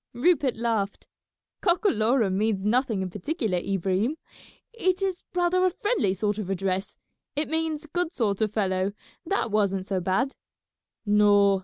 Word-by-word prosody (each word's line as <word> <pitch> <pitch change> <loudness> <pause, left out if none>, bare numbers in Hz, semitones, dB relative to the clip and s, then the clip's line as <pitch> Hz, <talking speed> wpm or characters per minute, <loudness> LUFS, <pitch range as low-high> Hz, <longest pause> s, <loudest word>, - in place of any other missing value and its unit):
Rupert 275 0 +2
laughed. 225 -4 -1 0.5
"Cockalorum 245 - +2
means 205 -1 0
nothing 225 -3 +1
in 185 - -5
particular, 210 - -1
Ibrahim; 195 - 0 0.6
it 370 -5 +1
is 375 -2 -1
rather 360 +1 +2
a 370 - +5
friendly 365 - 0
sort 205 +2 -1
of 195 -3 -4
address: 190 0 -2 0.4
it 295 +1 0
means 320 -1 -1
good 350 +2 -2
sort 215 - -1
of 215 -2 +1
fellow. 190 -2 0 0.3
That 335 - 0
wasn't 195 -3 +1
so 190 -1 -1
bad." 190 +10 0 0.7
"No. 205 -1 +5
215 Hz, 140 wpm, -26 LUFS, 195-310 Hz, 0.7 s, a